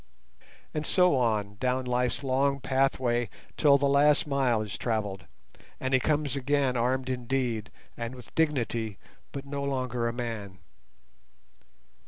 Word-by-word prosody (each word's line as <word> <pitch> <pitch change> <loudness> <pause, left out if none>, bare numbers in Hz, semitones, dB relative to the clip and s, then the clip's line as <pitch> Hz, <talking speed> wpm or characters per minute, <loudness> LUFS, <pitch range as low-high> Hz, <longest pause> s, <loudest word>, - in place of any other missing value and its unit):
And 150 - -2
so 180 -1 +4
on, 105 -5 0
down 130 0 0
life's 125 +2 0
long 140 +1 +1
pathway 130 -3 +1 0.3
till 145 -2 +5
the 140 - 0
last 145 +2 +4
mile 130 -6 +1
is 105 - -6
travelled, 100 -6 -2 0.5
and 130 0 -2
he 130 - +6
comes 145 +1 0
again 140 -1 +1
armed 125 +2 0
indeed, 125 -4 -1 0.3
and 115 +2 -5
with 125 -4 -13
dignity, 120 -9 0 0.3
but 140 0 -6
no 140 0 -4
longer 125 -3 -1
a - - 0
man. 115 -6 -5
130 Hz, 135 wpm, -28 LUFS, 115-140 Hz, 0.5 s, he